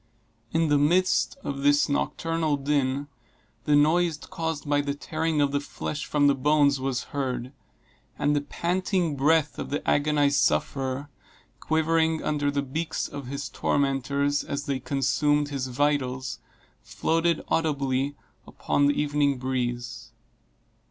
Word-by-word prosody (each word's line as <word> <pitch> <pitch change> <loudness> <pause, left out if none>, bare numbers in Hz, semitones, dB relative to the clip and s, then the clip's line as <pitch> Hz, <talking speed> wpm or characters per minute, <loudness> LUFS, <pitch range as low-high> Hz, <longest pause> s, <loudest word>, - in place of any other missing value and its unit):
In 165 -1 +1
the 145 -1 +4
midst 180 - +2
of 140 -1 -4
this 145 +1 +4
nocturnal 160 +1 -1
din, 140 -1 0 0.6
the 150 - +4
noise 160 +2 +3
caused 160 -3 -5
by 145 0 +2
the 140 0 -3
tearing 160 +1 -2
of 140 -1 +2
the 145 - +1
flesh 145 +1 -5
from 145 -1 +2
the 140 - +5
bones 140 0 +3
was 130 -2 -2
heard, 130 -2 -3 0.6
and 145 +1 +1
the 145 - +1
panting 175 +1 -1
breath 150 0 +2
of - - -4
the 145 - -3
agonized 145 -1 +3
sufferer, 135 +1 0 0.5
quivering 160 0 +1
under 145 -1 0
the 140 0 -1
beaks 155 +5 -3
of 140 -3 -8
his 140 +2 -4
tormentors, 140 +1 0
as 140 0 -4
they 135 -2 -1
consumed 145 +2 +1
his 135 -2 -3
vitals, 130 -1 -1 0.4
floated 165 0 0
audibly 140 -3 0 0.3
upon 145 - +1
the 145 - +1
evening 145 -2 +1
breeze. 120 -3 -3
145 Hz, 135 wpm, -26 LUFS, 135-155 Hz, 0.6 s, the